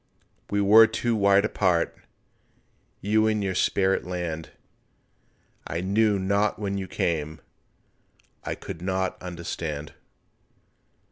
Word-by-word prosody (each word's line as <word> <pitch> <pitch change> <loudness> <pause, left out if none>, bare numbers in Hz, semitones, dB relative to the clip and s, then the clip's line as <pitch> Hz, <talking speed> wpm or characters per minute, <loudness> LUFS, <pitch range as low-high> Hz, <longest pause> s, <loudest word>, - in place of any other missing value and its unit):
We 100 0 +1
were 110 +3 +7
too 115 +1 -1
wide 100 0 +4
apart— 90 -6 +1 1.1
You 110 +2 +2
in 105 -1 0
your 95 -1 -1
spirit 95 +1 +1
land— 85 -3 -4 1.2
I 85 +2 -3
knew 105 +2 +2
not 100 +2 +1
when 100 -2 -3
you 95 - -5
came, 80 -3 -2 1.0
I - - -3
could 80 - -8
not 95 0 -1
understand. 85 -4 -5
95 Hz, 110 wpm, -25 LUFS, 85-105 Hz, 1.2 s, were